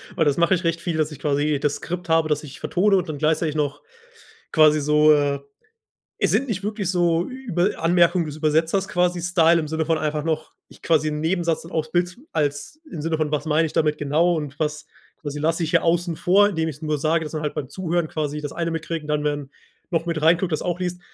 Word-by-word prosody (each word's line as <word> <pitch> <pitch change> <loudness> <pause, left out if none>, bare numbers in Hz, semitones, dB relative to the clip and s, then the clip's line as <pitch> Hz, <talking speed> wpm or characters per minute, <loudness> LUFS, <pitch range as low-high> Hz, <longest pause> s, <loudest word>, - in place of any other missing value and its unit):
Weil 160 - +2
das 145 0 +2
mache 170 +2 +3
ich 185 - 0
recht 165 0 0
viel, 170 -2 -2
dass 155 0 0
ich 145 - -10
quasi 145 0 0
das 145 0 0
Skript 180 0 -6
habe, 160 -1 +3
dass 150 - 0
ich 140 - -10
vertone 195 +2 +2
und 180 -2 -2
dann 150 - -4
gleichzeitig 155 0 0
noch 145 -2 -1 0.7
quasi 155 -1 +5
so, 150 +1 +5
äh 145 -1 +1 0.8
es - - +3
sind 270 0 +1
nicht 195 -3 -2
wirklich 205 -3 -2
so 175 -2 +1
Über 210 -9 -2
Anmerkungen 170 0 +3
des 150 0 -7
Übersetzers 160 +5 +1
quasi, 175 -1 0
Style 170 -1 +4
im 155 -2 -3
Sinne 160 0 -1
von, 165 - +2
einfach 150 -1 -2
noch 155 -1 -2 0.2
ich - - -18
quasi 155 -2 +2
'n 150 0 -3
Nebensatz 165 0 0
und 165 - -11
auf's 160 -1 -2
Bild 175 +3 0
als 145 - -2
im 160 - -5
Sinne 160 +1 -1
von: 155 -1 -1
Was 150 0 -2
meine 155 +1 +2
ich - - -7
damit 150 -1 +1
genau? 160 +4 +1
Und 145 -2 -5
was 150 0 -2 0.4
quasi 145 -1 -5
lasse 165 +3 0
ich 160 - -3
hier - - +3
außen 170 0 +1
vor, 200 +3 +4
indem 160 -4 -1
ich's 150 0 -8
nur 155 -1 -1
sage, 160 +2 +1
dass 150 - -7
man 155 -1 -3
halt 150 - -3
beim 140 -4 -5
Zuhören 175 -3 -1
quasi 150 -1 -3
das 145 - -5
eine 170 -1 -2
mitkriegen 165 -1 -4
und - - -11
dann 150 - -4
werden 145 -2 -2 0.4
noch 165 0 +1
mit 165 -2 -2
rein 165 +3 +5
guckt, 180 -2 -2
das 155 - -1
auch 175 0 -2
liest 180 -1 -3
160 Hz, 240 wpm, -23 LUFS, 150-175 Hz, 0.8 s, quasi